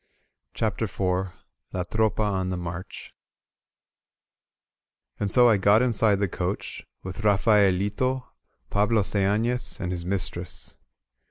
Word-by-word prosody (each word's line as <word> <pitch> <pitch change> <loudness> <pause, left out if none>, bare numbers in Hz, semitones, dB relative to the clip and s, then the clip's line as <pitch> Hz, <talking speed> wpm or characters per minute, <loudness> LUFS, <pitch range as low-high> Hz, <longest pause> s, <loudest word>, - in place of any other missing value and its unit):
CHAPTER 110 0 -1
IV 95 0 -1 0.4
LA 90 - -1
TROPA 110 +3 0
ON 95 -3 -1
THE 90 - -2
MARCH 85 +1 -7 2.1
AND 105 - -1
so 120 +3 +6
I 110 -3 +5
got 100 +4 +4
inside 115 -4 +3
the 100 0 0
coach, 90 +2 -4 0.2
with 95 +3 -6
Rafaelito, 105 +4 +2 0.5
Pablo 105 +1 +2
Seafles, 110 +6 0
and 90 -3 -3
his 85 -1 -4
mistress. 90 -1 -4
100 Hz, 110 wpm, -25 LUFS, 95-110 Hz, 2.1 s, so